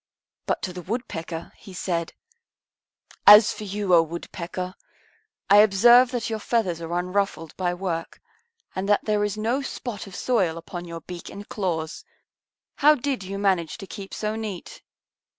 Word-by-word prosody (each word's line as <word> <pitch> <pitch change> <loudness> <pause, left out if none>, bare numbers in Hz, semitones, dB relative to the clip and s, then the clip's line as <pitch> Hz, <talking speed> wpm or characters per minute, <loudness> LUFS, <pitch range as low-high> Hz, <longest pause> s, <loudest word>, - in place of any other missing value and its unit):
But - - -1
to 185 - -3
the 180 - -7
Woodpecker 170 -5 -5
He 190 - -12
said, 170 -2 -2 1.1
"As 210 +1 +10
for 215 - -7
you, 200 -1 -1
O 170 - +8
Woodpecker, 170 +2 -5 0.7
I 200 - +7
observe 235 +5 +7
that 245 -2 -2
your 220 -1 -3
feathers 195 -7 0
are 170 +1 -3
unruffled 180 -3 -2
by 175 -1 -1
work 175 -3 -4 0.6
and 190 +2 -2
that 205 - +3
there 210 -1 +1
is 210 0 -2
no 235 +6 0
spot 240 -6 -6
of 190 - -10
soil 190 -10 +1
upon 175 +1 -7
your 170 -1 -7
beak 175 0 -8
and 205 +1 -9
claws. 165 -6 -3 0.7
How 300 +2 +6
did 270 -3 -2
you 195 +1 -5
manage 190 -5 0
to 205 - -8
keep 195 +2 -9
so 215 0 -3
neat?" 215 -5 -6
195 Hz, 160 wpm, -25 LUFS, 175-215 Hz, 1.1 s, As